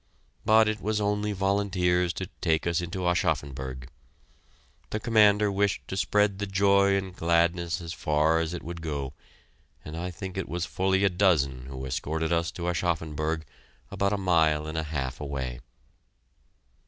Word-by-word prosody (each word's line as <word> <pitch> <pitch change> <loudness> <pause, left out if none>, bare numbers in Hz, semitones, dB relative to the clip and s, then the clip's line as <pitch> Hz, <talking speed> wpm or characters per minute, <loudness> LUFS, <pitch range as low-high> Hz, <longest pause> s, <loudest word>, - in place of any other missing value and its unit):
But 110 0 +6
it 110 0 -2
was 105 0 0
only 105 0 0
volunteers 95 -3 +1
to 95 - -4 0.2
take 80 -3 +1
us 85 0 +1
into 90 +1 -3
Aschaffenburg. 65 -6 -1 1.0
The 105 - -2
commander 105 -2 +4
wished 100 0 0
to - - -3
spread 105 0 +2
the 105 - -2
joy 100 0 +4
and 95 -2 -3
gladness 85 -1 +1
as 85 -1 -6
far 80 +1 +2
as 80 -1 -1
it - - -7
would 85 0 -6
go, 70 -4 -4 0.7
and 75 - -7
I 90 +2 -3
think 95 +2 -7
it 95 - -4
was 85 0 -2
fully 95 +1 +1
a 100 - +5
dozen 70 -9 +2
who 65 0 -6
escorted 80 +5 -2
us 85 0 +1
to 85 0 -4
Aschaffenburg, 80 -2 -1 0.5
about 100 0 0
a 105 - +1
mile 80 -5 +2
and 80 +1 -5
a 80 - 0
half 65 -4 -3
away. 65 -4 -4
85 Hz, 160 wpm, -27 LUFS, 80-100 Hz, 1.0 s, But